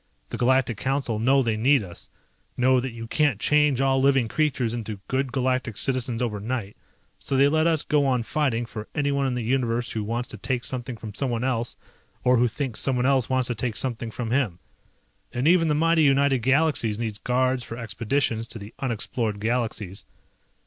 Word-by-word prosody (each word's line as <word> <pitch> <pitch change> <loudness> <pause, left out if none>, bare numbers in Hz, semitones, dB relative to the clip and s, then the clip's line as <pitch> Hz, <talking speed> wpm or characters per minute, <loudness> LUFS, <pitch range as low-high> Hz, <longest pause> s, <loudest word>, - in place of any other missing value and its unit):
The - - -5
Galactic 125 -2 +2
Council 130 -3 -1
know 135 +4 +3
they 115 -2 0
need 130 +3 +3
us, 85 -3 -8 0.5
know 130 +1 +4
that 130 +2 -3
you 115 -1 -8
can't 135 -2 +1
change 150 0 +3
all 135 -1 +2
living 135 -3 +3
creatures 130 -4 0
into 110 -3 -5
good 130 0 -1
Galactic 130 -4 -1
citizens 125 -2 0
overnight, 105 -1 -3 0.4
so 135 - -1
they 140 +1 +6
let 155 +2 +2
us 160 -3 +2
go 150 -1 +2
on 125 -3 +1
fighting 120 -3 -1
for 110 -1 -8
anyone 140 -1 +1
in 125 - -1
the 120 - -2
Universe 120 -1 0
who 110 - -3
wants 120 +3 -2
to 110 - -5
take 125 +4 -2
something 125 -2 -4
from 110 -2 -8
someone 120 -1 -2
else, 120 -2 -1 0.5
or 125 0 +4
who 120 +1 +4
thinks 125 0 -3
someone 125 -2 +2
else 135 -3 +2
wants 130 -1 +1
to - - 0
take 115 0 -2
something 120 -3 -2
from 115 0 -5
him. 120 -9 0 0.7
And 125 +4 -1
even 170 -1 +4
the 150 - +2
mighty 165 +1 +3
United 140 -2 +3
Galaxies 130 -4 +2
needs 110 -3 -4
guards 130 0 0
for 115 - -7
expeditions 115 0 -1
to 115 - -7
the 105 0 -10
unexplored 115 -3 -2
galaxies. 110 -4 -2
125 Hz, 190 wpm, -25 LUFS, 115-135 Hz, 0.7 s, they